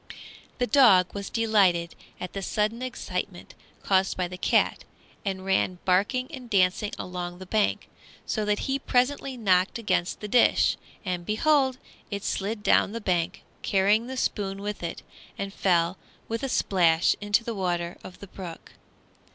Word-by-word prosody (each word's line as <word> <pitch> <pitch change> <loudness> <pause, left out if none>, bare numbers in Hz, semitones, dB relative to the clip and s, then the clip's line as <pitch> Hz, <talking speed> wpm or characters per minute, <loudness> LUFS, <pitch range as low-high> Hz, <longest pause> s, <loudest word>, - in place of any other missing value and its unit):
The 245 - +1
dog 220 -10 +5
was 200 -1 -5
delighted 195 -7 +2 0.3
at 180 - -6
the 195 - -4
sudden 215 +4 -1
excitement 255 -1 -5 0.3
caused 190 -1 +2
by 180 -1 0
the 180 - -8
cat, 180 - +1 0.4
and 190 -2 -3
ran 190 -1 +1
barking 205 +8 +2
and 255 -5 -9
dancing 195 +1 +2
along 175 -1 -5
the 185 - -9
bank, 210 +2 0 0.4
so 215 - -1
that 210 0 0
he 270 0 0
presently 265 +1 0
knocked 190 -3 +2
against 185 -5 -1
the 210 - -5
dish, 240 +4 +4 0.3
and 180 -2 -2
behold! 265 - +2 0.3
it 200 -1 -4
slid 205 +2 -2
down 205 - +3
the 230 - -3
bank, 180 -3 -1 0.2
carrying 205 +4 +2
the 260 0 -5
spoon 195 -4 -2
with 210 0 -4
it, 170 - -5 0.3
and 195 0 -4
fell 175 -2 +1 0.3
with 230 0 -3
a 270 - -2
splash 170 -7 +3
into 205 +2 +2
the 230 - -4
water 175 -3 -2
of 185 - -11
the 200 - -9
brook. 180 -3 -9
200 Hz, 160 wpm, -26 LUFS, 180-230 Hz, 0.4 s, dog